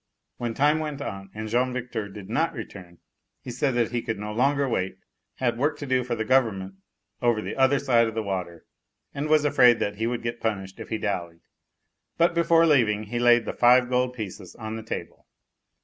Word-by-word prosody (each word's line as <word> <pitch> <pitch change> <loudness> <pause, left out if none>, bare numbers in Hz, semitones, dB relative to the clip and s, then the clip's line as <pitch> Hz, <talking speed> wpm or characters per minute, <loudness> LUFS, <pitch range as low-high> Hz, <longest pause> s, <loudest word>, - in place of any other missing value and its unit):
When 120 -2 -3
time 150 +3 +3
went 150 -3 -4
on 100 -8 -6
and 110 0 -5
Jean 125 +3 +1
Victor 120 -4 -4
did 100 -1 -10
not - - 0
return, 85 -1 -9 0.4
he 125 - -8
said 130 +2 0
that 120 -2 +1
he 120 -1 -1
could 115 -2 -3
no 105 +1 -5
longer 140 +4 +2
wait, 95 -6 -2 0.4
had 120 -2 -1
work 145 +2 +1
to 145 - -6
do 130 -1 +1
for 120 -1 -2
the 110 -1 -3
Government 110 -7 +1 0.5
over 120 -2 +2
the - - -5
other 135 +1 +4
side 120 -4 +3
of 110 - -5
the 110 - -1
water 90 -4 -5 0.5
and 145 +2 -3
was 155 -1 +4
afraid 125 -5 +5 0.2
he 115 +2 -1
would 120 -1 -3
get 120 0 -4
punished 95 -4 -3
if - - -8
he 110 - -1
dallied. 85 -6 -4 0.8
But, 170 +1 +3
before 170 0 +4
leaving, 115 -9 +3
he 120 +3 -4
laid 120 -1 +5
the - - -3
five 125 +1 +5
gold 125 0 +1
pieces 100 -4 -7
on 110 -1 -6
the 110 - -5
table. 110 - -7
120 Hz, 205 wpm, -25 LUFS, 105-130 Hz, 0.8 s, afraid